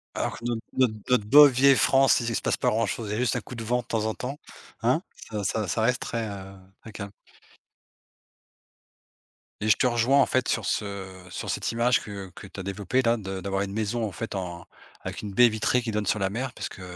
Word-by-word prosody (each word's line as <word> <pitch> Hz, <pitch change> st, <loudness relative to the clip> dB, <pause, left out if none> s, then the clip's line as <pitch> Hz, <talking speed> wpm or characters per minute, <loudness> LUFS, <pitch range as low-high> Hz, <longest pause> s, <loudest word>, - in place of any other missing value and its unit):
Alors -, -, -2 dB
que 115 Hz, -, -10 dB
notre 120 Hz, -2 st, -1 dB, 0.2 s
notre 125 Hz, -4 st, +3 dB, 0.2 s
notre 120 Hz, -5 st, +3 dB
bonne 145 Hz, +5 st, +9 dB
vieille 135 Hz, +2 st, +5 dB
France, 135 Hz, +1 st, +4 dB
il 120 Hz, 0 st, -2 dB
s 115 Hz, -, 0 dB
se -, -, -4 dB
passe -, -, 0 dB
pas -, -, +1 dB
grand 115 Hz, +1 st, +1 dB
chose, 110 Hz, -3 st, -4 dB
il -, -, -2 dB
y -, -, -1 dB
a -, -, -2 dB
juste 125 Hz, -3 st, +1 dB
un -, -, -1 dB
coup 125 Hz, -, -10 dB
de 115 Hz, -, -5 dB
vent 125 Hz, +2 st, +1 dB
de -, -, -5 dB
temps 110 Hz, -1 st, -1 dB
en 110 Hz, -, 0 dB
temps, 135 Hz, +3 st, -5 dB, 0.5 s
hein? -, -, +3 dB, 0.3 s
Ça 105 Hz, -2 st, -3 dB
ça 105 Hz, 0 st, -1 dB
ça 110 Hz, +6 st, -1 dB
reste 125 Hz, +3 st, +1 dB
très, 115 Hz, -2 st, -3 dB
heu, 95 Hz, -1 st, -8 dB, 0.3 s
très 110 Hz, -, -11 dB
calme. 100 Hz, -1 st, -7 dB, 2.5 s
Et 110 Hz, -, 0 dB
je -, -, +7 dB
te 125 Hz, -, +3 dB
rejoins 120 Hz, +4 st, +3 dB
en -, -, +5 dB
fait, 130 Hz, -1 st, 0 dB
sur 110 Hz, -4 st, 0 dB
ce 95 Hz, -3 st, -4 dB
sur -, -, -6 dB
cette -, -, -1 dB
image 120 Hz, +1 st, +2 dB
que 100 Hz, -2 st, -8 dB
que 100 Hz, -, -10 dB
tu 95 Hz, -, -10 dB
as -, -, -4 dB
développée, 100 Hz, +6 st, -1 dB
là, 115 Hz, -1 st, +2 dB
de 95 Hz, -2 st, -5 dB
d'avoir 95 Hz, 0 st, -2 dB
une 100 Hz, 0 st, -3 dB
maison 110 Hz, +2 st, -1 dB
en 105 Hz, -, -4 dB
fait, 105 Hz, +3 st, -5 dB
en 85 Hz, -2 st, -5 dB, 0.4 s
avec -, -, -6 dB
une 105 Hz, -2 st, -6 dB
baie 120 Hz, +4 st, +7 dB
vitrée 110 Hz, +3 st, +1 dB
qui 115 Hz, -2 st, -3 dB
donne 105 Hz, -1 st, -1 dB
sur 100 Hz, +2 st, +1 dB
la 95 Hz, 0 st, 0 dB
mer, 125 Hz, +4 st, -4 dB
parce -, -, -5 dB
que, 95 Hz, -, -12 dB
110 Hz, 250 wpm, -26 LUFS, 100-120 Hz, 2.5 s, bonne